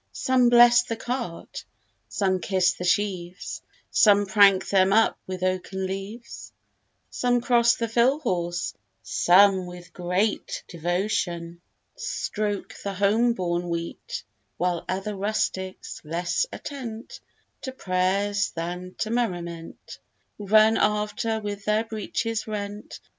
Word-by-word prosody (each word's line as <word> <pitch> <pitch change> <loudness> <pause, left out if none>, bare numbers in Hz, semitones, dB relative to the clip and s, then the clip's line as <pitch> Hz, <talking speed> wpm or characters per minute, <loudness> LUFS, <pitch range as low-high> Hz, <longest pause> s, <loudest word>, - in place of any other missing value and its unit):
Some 255 -2 +3
bless 240 0 +7
the 235 -2 -4
cart; 240 -6 -5 0.5
some 190 -2 0
kiss 185 0 +2
the 180 - -7
sheaves; 185 -1 -1 0.3
Some 205 -1 +5
prank 195 -1 +5
them 190 -1 +3
up 220 +2 +3
with 185 -1 -5
oaken 185 +1 -1
leaves: 195 +5 -7 0.6
Some 245 -1 +1
cross 235 -1 +4
the 230 - -2
fill 240 +5 +3
horse; 175 - -2 0.3
some 190 0 +4
with 175 0 -11
great 180 +4 -1
Devotion, 175 -1 -2 0.3
stroke 205 -2 -3
the 200 -1 -3
home 215 +5 +3
borne 175 -3 -2
wheat: 170 0 -5 0.3
While 175 -1 -1
other 195 +3 -2
rustics, 190 -2 -3
less 175 - -1
attent 240 -5 -7 0.4
To 260 - -5
prayers, 200 -1 0
than 180 +2 -5
to 220 - -1
merriment, 175 -8 -4 0.4
Run 215 +2 +5
after 210 +1 0
with 205 -1 -5
their 215 +1 +2
breeches 225 0 -3
rent. 205 -1 -6
200 Hz, 115 wpm, -25 LUFS, 180-220 Hz, 0.6 s, bless